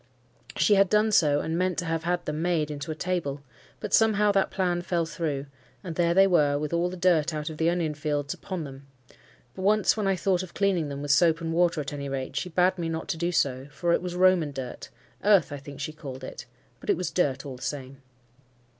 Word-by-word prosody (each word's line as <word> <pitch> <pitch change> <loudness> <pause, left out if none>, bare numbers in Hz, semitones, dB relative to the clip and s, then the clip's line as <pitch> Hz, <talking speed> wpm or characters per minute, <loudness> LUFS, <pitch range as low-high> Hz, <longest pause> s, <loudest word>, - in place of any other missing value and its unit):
She 210 - +4
had 195 -1 +4
done 215 +1 +3
so, 150 -7 +4
and 160 - -2
meant 185 -1 0
to 175 - -2
have 165 0 -2
had 175 0 -1
them 150 +1 -3
made 165 -4 0
into 145 0 -6
a 155 - -2
table; 155 -5 -2 0.4
but 210 - -5
somehow 210 -2 +4
that 195 -1 +2
plan 180 -2 0
fell 170 -1 -1
through, 150 -3 -3 0.4
and 170 -4 -6
there 170 0 +2
they 195 +1 +7
were 150 -6 +3
with 150 +2 -3
all 170 +1 +1
the 185 - -7
dirt 170 -3 +2
out 150 +1 -3
of 155 - -9
the 160 +1 +2
onion 170 -3 0
field 145 -1 -2
upon 185 -4 -5
them; 140 -1 -10 0.7
but - - -8
once 210 +1 +3
when 210 -3 -1
I 195 - +2
thought 185 0 +1
of 185 -2 -9
cleaning 185 -6 +1
them 140 0 -5
with 145 - 0
soap 165 +2 +4
and 165 -1 -3
water, 170 -2 +2
at 145 0 -6
any 140 -1 -5
rate, 135 -1 -4
she 180 - -2
bade 180 +2 +2
me 165 -1 -2
not 160 0 -4
to - - -1
do 170 +2 -1
so, 135 -5 0
for 170 +3 0
it - - +2
was 180 -1 -5
Roman 180 -4 +4
dirt—earth, 135 - -1
I 145 - -4
think, 140 0 -10
she 150 +2 -4
called 135 -4 -8
it—but - - -11
it - - +3
was 180 -2 -3
dirt 140 -6 0
all 135 -3 -7
the - - -17
same. 135 -1 -5
165 Hz, 235 wpm, -27 LUFS, 145-180 Hz, 0.7 s, they